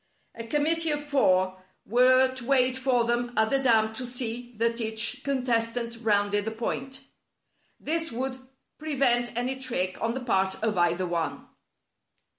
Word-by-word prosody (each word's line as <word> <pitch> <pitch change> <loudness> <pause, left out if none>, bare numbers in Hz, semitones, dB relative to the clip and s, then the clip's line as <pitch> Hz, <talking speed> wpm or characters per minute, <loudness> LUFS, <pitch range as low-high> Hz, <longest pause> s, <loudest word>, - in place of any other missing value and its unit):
A 230 0 -8
committee 320 +5 +1
of 295 -1 0
four 185 -10 +2 0.2
were 255 +3 +4
to 260 -2 -8
wait 260 -2 +3
for 260 -2 +1
them 240 +1 -1
at 220 0 +3
the 275 - +3
dam 220 -4 +3
to 255 - -6
see 245 -1 -4
that 230 +1 0
each 225 +4 -2
con 270 -3 -1
testant 230 -1 -1
rounded 205 -2 +1
the - - -1
point. 260 +4 -4 0.8
This 325 +2 -2
would 260 +2 -3 0.4
prevent 255 -6 +1
any 255 +2 -1
trick 185 -8 -2
on 230 +1 -1
the - - -2
part 190 -5 +1
of 220 -1 +1
either 175 +1 +1
one. 170 -2 -3
240 Hz, 155 wpm, -27 LUFS, 220-260 Hz, 0.8 s, were